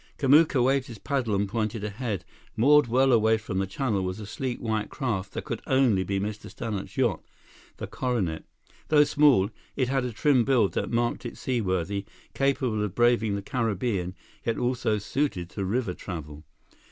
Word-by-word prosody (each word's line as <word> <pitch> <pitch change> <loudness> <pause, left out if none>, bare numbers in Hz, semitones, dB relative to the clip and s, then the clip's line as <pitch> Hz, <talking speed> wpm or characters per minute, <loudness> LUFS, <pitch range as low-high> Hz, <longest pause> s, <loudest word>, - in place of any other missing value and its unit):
Kamuka 145 -1 +5
waved 135 +1 +2
his 115 - -9
paddle 130 -6 -1
and 100 +1 +1
pointed 110 0 -2
ahead. 105 -2 -3 0.3
Moored 145 +4 +5
well 130 +3 +3
away 110 -1 +4
from 105 -3 -4
the 95 - -1
channel 105 0 -1
was 95 +2 -3
a 105 - -6
sleek 125 +4 -4
white 110 -2 -2
craft 105 -8 -3
that - - -4
could - - -4
only 130 -8 +3
be 95 +1 -1
Mr. 105 +1 -5
Stannart's 110 -2 -5
yacht, 120 -9 +1 0.6
the - - -5
Coronet. 105 -11 -2 0.4
Though 150 -1 +6
small, 140 -9 +4 0.2
it 130 -2 0
had 135 -1 +1
a 125 - -2
trim 130 +2 +3
build 120 -6 +2
that - - -2
marked 120 0 0
it 120 - -7
seaworthy, 100 -5 -1 0.3
capable 130 -5 0
of 105 -4 -4
braving 120 -3 +3
the 100 - -4
Caribbean, 105 -6 -1 0.3
yet 115 - -1
also 120 -3 0
suited 100 -5 -2
to 100 - -4
river 100 0 -1
travel. 75 -5 -8
115 Hz, 175 wpm, -27 LUFS, 100-130 Hz, 0.6 s, Though